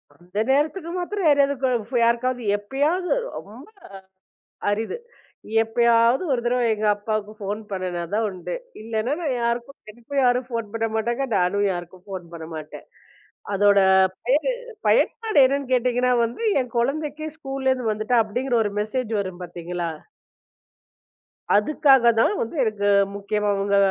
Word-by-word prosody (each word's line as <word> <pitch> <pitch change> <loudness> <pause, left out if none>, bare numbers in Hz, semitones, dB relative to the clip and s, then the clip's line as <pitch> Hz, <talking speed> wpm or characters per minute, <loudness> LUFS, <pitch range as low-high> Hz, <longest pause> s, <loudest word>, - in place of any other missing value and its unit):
அந்த 180 +3 -12
நேரத்துக்கு 310 +5 +1
மாத்திரம் 375 +1 -2
யாரையாவது 280 -1 +4
கோஃப் 250 -2 -1
யாருக்காவது 240 +1 +1
எப்பயாவது 290 - -1 0.3
ரொம்ப 225 +8 -11 1.0
அரிது. 220 - -2 0.7
எப்பயாவது 235 +5 +3
ஒருதடவை 240 0 0
எங்க 215 0 -3
அப்பாவுக்குப் 215 0 -4
ஃபோன் 205 +2 -3
பண்ணுனா 185 -2 -3
தான் 220 +1 +1
உண்டு. 185 - -6 0.3
இல்லேன்னா 225 +3 -2
நான் 280 -6 -1
யாருக்கும் 235 +3 -2
எனக்கும் 240 +5 -3
யாரும் 250 0 +2
ஃபோன் 230 -3 -4
பண்ண 225 0 0
மாட்டாங்க, 235 +4 -1
நானும் 195 +3 +1
யாருக்கும் 175 +1 -7
ஃபோன் 190 -3 -6
பண்ண 160 -1 -8
மாட்டேன். 155 -1 -9 0.7
அதோட 200 0 +4 0.5
பயனு 295 - +2 0.4
பயன்பாடு 450 -5 +2
என்னன்னு 275 -1 -2
கேட்டிங்கன்னா 250 0 +2
வந்து, 235 - -5 0.2
என் 250 -1 -6
கொழந்தைக்கு, 300 +5 -1
ஸ்கூல்ல" 270 -2 -2
இருந்து 250 -4 -1
வந்துட்டா" 215 +3 +1
அப்படிங்கற 245 +4 -1
ஒரு 205 - -2
மெசேஜ் 225 +2 -3
வரும் 185 -2 -6
பாத்தீங்களா 175 0 -5 1.7
அதுக்காகத்தான் 240 - +4
வந்து 230 - -4
எனக்கு 210 -3 -1 0.3
முக்கியமா 205 +1 -1
உங்க 200 0 +2
235 Hz, 130 wpm, -23 LUFS, 205-265 Hz, 1.7 s, யாரையாவது